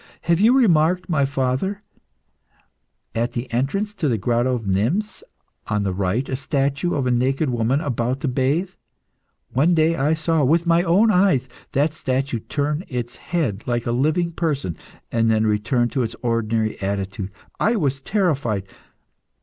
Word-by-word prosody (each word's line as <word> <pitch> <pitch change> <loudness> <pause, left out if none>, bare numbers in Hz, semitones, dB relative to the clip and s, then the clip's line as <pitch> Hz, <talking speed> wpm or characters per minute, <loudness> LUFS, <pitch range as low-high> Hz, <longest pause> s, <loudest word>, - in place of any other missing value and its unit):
Have 170 0 +1
you 235 +6 +5
remarked, 180 - +3
my 145 -5 +2
father, 135 +9 -1 1.3
at 120 +2 -1
the 120 0 -5
entrance 195 - -1
to 175 -7 -1
the 120 -4 +1
Grotto 120 +4 +1
of 115 -3 -5
Nymphs, 120 - 0 0.5
on 105 -1 0
the 95 -2 -1
right, 100 +7 -1
a 130 - -2
statue 140 +4 -1
of 135 - 0
a 125 - +1
naked 130 +4 +1
woman 120 +3 +1
about 125 -1 -1
to - - -1
bathe? 140 +8 0 0.8
One 155 +7 +3
day 160 +1 +3
I 155 +1 +1
saw, 160 -1 +1
with 165 +6 +3
my 170 0 +4
own 190 +6 +4
eyes, 180 -10 +3 0.3
that 145 +3 +2
statue 130 -4 -1
turn 150 +7 -2
its 120 -2 -5
head 140 - -2
like 120 -1 -1
a 120 - 0
living 155 +8 +1
person, 145 - -2 0.4
and 115 -1 +2
then 110 0 +2
return 115 +3 +1
to 130 - -1
its 115 -2 -3
ordinary 115 -2 0
attitude. 100 0 -3 0.3
I 225 +3 +2
was 140 - 0
terrified. 140 - 0
135 Hz, 160 wpm, -22 LUFS, 120-165 Hz, 1.3 s, you